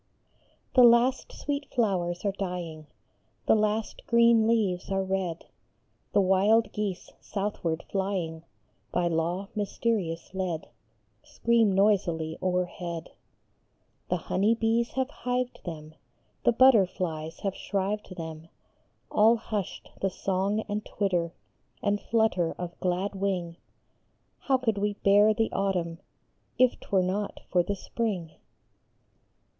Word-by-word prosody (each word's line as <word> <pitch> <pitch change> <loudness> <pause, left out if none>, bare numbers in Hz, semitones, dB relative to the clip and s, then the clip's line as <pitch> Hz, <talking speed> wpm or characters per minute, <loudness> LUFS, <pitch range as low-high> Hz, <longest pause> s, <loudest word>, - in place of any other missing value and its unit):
HE 255 - +8
last 240 +2 +5
sweet 285 0 -4
flowers 185 -6 0
are 200 - +2
dying, 175 -5 -5 0.6
The - - +5
last 215 0 0
green 235 -1 +5
leaves 205 -7 +1
are 195 0 +1
red; 190 -3 -2 0.7
The 205 - +5
wild 200 +4 +3
geese 205 -4 -3
southward 195 -5 -3
flying, 190 -5 -2 0.5
By 175 -1 +1
law 170 +4 -1
mysterious 200 -5 -2
led, 180 -4 -3 0.5
Scream 230 -3 +2
noisily 180 -6 +2
o 185 - +1
erhead; 175 -2 -3 1.0
The - - +1
honey 210 +4 +1
bees 230 +1 +1
have 265 +1 -1
hived 250 -1 -3
them, 155 -3 -7 0.5
The - - +6
butterflies 185 -10 +3
have 195 -2 -1
shrived 200 0 -3
them; 160 -1 -7 0.6
All 220 +2 +5
hushed 215 -4 -5
the 195 - +2
song 195 +3 -1
and 210 0 -4
twitter 175 -4 -1 0.5
And 205 0 +1
flutter 220 -7 +1
of 175 -1 -5
glad 185 +3 -1
wing; 190 -4 -2 0.8
How 270 -2 +2
could 225 -5 0
we 205 0 0
bear 205 +2 +5
the 225 +1 0
autumn 175 -4 -1 0.6
If 255 0 +3
t - - -15
were 190 -2 +3
not 200 +3 -2
for 180 - +4
the 200 +4 -2
spring 195 -5 -3
195 Hz, 120 wpm, -28 LUFS, 175-220 Hz, 1.0 s, HE